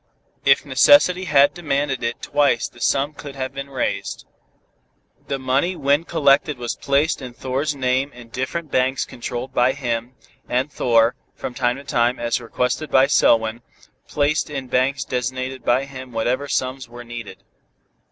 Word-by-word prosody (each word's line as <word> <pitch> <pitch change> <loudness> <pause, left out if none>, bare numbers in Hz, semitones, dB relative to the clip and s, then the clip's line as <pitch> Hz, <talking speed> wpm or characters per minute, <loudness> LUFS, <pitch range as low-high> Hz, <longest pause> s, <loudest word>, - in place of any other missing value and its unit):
If - - +4
necessity 185 -10 +5
had 140 -4 +4
demanded 140 -5 -1
it 115 0 -3
twice 145 -5 +2
the 120 - -17
sum 140 +4 +1
could 145 -1 -9
have 130 -1 -4
been 140 0 -6
raised. 110 -7 -3 1.0
The 140 - -1
money 135 +7 0
when 145 +2 +1
collected 145 -3 +2
was 120 -1 -3
placed 140 +3 +1
in 125 -2 -7
Thor's 135 +4 -2
name 130 +1 0
in 120 -2 -13
different 140 +6 -4
banks 130 +1 +1
controlled 125 +2 -6
by 125 +1 +3
him, 120 -2 -3 0.3
and 130 +4 0
Thor, 115 -1 +3 0.2
from 125 - -6
time 125 -1 0
to 140 - -10
time, 120 -1 +1
as 120 +1 -1
requested 125 +6 -2
by 130 0 +5
Selwyn, 115 -4 +3 0.5
placed 150 +2 0
in 135 -3 -5
banks 130 +2 +1
designated 130 0 -3
by 125 +3 +2
him 130 -2 -10
whatever 120 +5 -1
sums 130 -1 -2
were 120 0 -10
needed. 120 -2 -9
130 Hz, 155 wpm, -21 LUFS, 120-140 Hz, 1.0 s, necessity